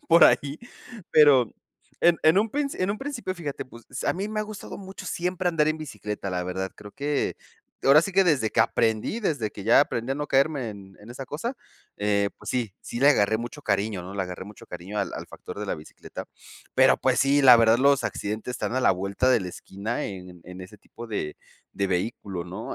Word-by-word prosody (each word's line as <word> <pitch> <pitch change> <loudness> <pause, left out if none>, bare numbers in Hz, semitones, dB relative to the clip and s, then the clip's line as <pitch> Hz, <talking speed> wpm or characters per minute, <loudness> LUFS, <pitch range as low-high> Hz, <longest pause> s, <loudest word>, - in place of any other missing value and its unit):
por 170 +1 +8
ahí, 145 +2 +3 0.5
pero 140 -7 +6 0.5
en 170 0 +5
en 160 +5 +5
un 220 +2 +2
princi 285 +2 -2
en 185 +2 +1
un 210 - -3
principio 270 -9 -4
fíjate, 155 -6 -5
pues, 115 -2 -15 0.2
a - - +2
mí 195 +4 -3
me 215 0 -2
ha - - 0
gustado 210 -2 -8
mucho 190 -1 -9
siempre 180 +1 -1
andar 165 -3 +2
en 155 0 -1
bicicleta, 105 -9 -5
la 90 -1 -2
verdad, 95 +1 -3
creo 105 -1 -11
que, 145 0 -1 0.5
ahora 145 +3 +7
sí 195 - -3
que 190 +1 +5
desde 135 -10 +2
que 110 - +2
aprendí, 110 - +1
desde 145 - -1
que 100 - -9
ya 115 +5 +6
aprendí 125 -2 -1
a - - -2
no 150 +1 -3
caerme 135 -2 +2
en 95 -2 -12
en 105 +3 -12
esa 135 +2 -7
cosa, 230 - -4 0.4
eh, 100 -1 +1
pues, - - -6
sí 120 -6 -1
sí 120 - -6
le 140 - +6
agarré 110 -6 +4
mucho 120 +5 -7
cariño 100 -3 0
¿no? 95 +2 -8
Le 100 - -1
agarré 90 0 -6
mucho 105 +1 -13
cariño 90 +4 -6
al - - -2
al - - -6
factor 90 - -10
de 105 - -4
la - - -1
bicicleta, 75 0 -10 0.5
pero, - - +6
pues, - - +2
sí, 140 +1 +4
la 125 -3 +10
verdad 115 0 +5
los 140 +1 +4
accidentes 110 +4 -3
están 120 - -3
a 130 - +2
la - - +5
vuelta 100 +7 0
de 125 -3 +4
la 90 - -4
esquina 100 +6 -5
en 90 -3 -8
en 90 +1 -10
ese 105 +3 -11
tipo 120 +4 -11
de 90 -9 -3 0.4
de 100 - -1
vehículo, 95 -1 -2
¿no? 95 +6 -6
120 Hz, 220 wpm, -26 LUFS, 100-150 Hz, 0.5 s, la